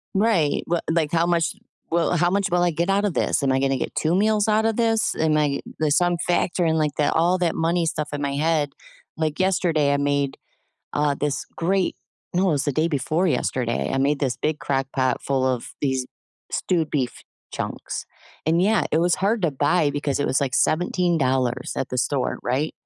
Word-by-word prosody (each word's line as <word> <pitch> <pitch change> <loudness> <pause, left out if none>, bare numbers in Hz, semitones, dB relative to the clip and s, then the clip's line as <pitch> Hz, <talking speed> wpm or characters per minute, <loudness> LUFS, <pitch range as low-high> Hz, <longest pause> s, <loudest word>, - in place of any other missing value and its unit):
Right, 195 -8 +2
well, 170 0 0
like, 160 -2 +1
"How 170 0 +2
much 170 -2 +1 0.4
will 170 +1 +2
how 175 +2 +3
much 200 +1 0
will 175 0 +3
I 175 - +2
get 170 +4 -1
out 200 +1 +2
of 200 - 0
this? - - 0
Am 135 - +2
I 130 - +2
gonna 135 0 +1
get - - -4
2 160 +3 +1
meals 210 +1 +2
out 220 +1 +2
of 225 - +1
this? 225 -1 +1
Am 155 -1 +2
I" 145 -2 +1 0.2
There's 155 -1 +2
some 175 -1 +2
factor 175 0 +1
in 160 0 +2
the 150 -1 +1
all 175 +3 +3
that 175 -2 0
money 170 +1 +1
stuff 155 -1 -2
in 145 - -3
my 140 -1 -1
head, 150 -1 +1 0.4
like, 155 -1 -2
yesterday, 170 -6 +2
I - - +2
made, 140 -1 0 0.6
uh, 145 -1 +1
this 145 -1 -1
great 185 +2 0 0.4
no, 185 +1 +2
it - - +2
was 145 -2 0
the 145 - 0
day 155 +5 +1
before 155 +4 0
yesterday, 125 -4 -1
I 135 - 0
made 140 +2 +2
this 130 -4 -1
big 155 0 0
crock 135 -1 -1
pot 130 -1 +1
full 135 -1 0
of 125 -2 -2
these 130 -2 0 0.4
stewed 165 -4 0
beef 130 -5 -2 0.3
chunks, - - -5 0.4
and 165 +3 +3
yeah, 215 +1 +3
it 155 - +2
was 175 +1 +2
hard 205 +2 0
to 170 - +2
buy 145 +2 +2
because 145 -1 -2
it 145 - 0
was, 130 - +1
like, 130 -2 -1
$17 135 -8 +1
at 135 - -2
the 125 - -2
store, 135 +1 0
right? 135 +6 -1
155 Hz, 205 wpm, -23 LUFS, 140-175 Hz, 0.6 s, how